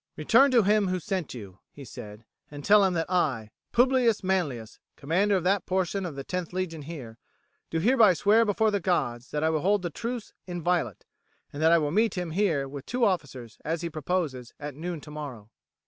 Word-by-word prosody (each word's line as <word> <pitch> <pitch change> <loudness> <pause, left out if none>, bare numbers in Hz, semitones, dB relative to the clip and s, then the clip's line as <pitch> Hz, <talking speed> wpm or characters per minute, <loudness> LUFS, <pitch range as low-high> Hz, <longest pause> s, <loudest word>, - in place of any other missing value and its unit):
"Return 280 +1 +5
to 245 -4 +4
him 205 0 +3
who 185 0 -1
sent 185 -7 -4
you," 100 -5 -10
he 140 - -11
said, 105 -1 -10 0.2
"and 145 -1 -9
tell 210 0 +6
him 190 -2 +2
that 165 -1 0
I, 130 - 0 0.2
Publius 245 -3 +3
Manlius, 150 -13 -2 0.2
commander 190 +8 +1
of 185 - 0
that 195 +2 +1
portion 190 0 -1
of 155 - -7
the 135 0 -6
10th 180 -2 -4
Legion 180 -4 -3
here, 135 -7 -9 0.5
do 165 - -2
hereby 220 +1 +5
swear 215 +6 +4
before 215 0 +1
the 200 - 0
gods 130 -10 -1
that 150 0 -2
I 160 - +2
will 155 -2 0
hold 200 +2 +2
the 175 - -3
truce 235 +5 -5
inviolate, 175 0 -1 0.5
and 145 - -5
that 160 +1 +5
I 170 - +7
will 150 -2 0
meet 220 +5 +2
him 175 -2 -3
here 160 -7 +1
with 140 0 -9
two 245 -1 +1
officers, 135 - -3
as 165 +2 -2
he 170 - -3
proposes, 155 -6 -3
at 145 0 -6
noon 165 +2 -5
tomorrow." 140 -8 -8
170 Hz, 200 wpm, -27 LUFS, 145-200 Hz, 0.5 s, I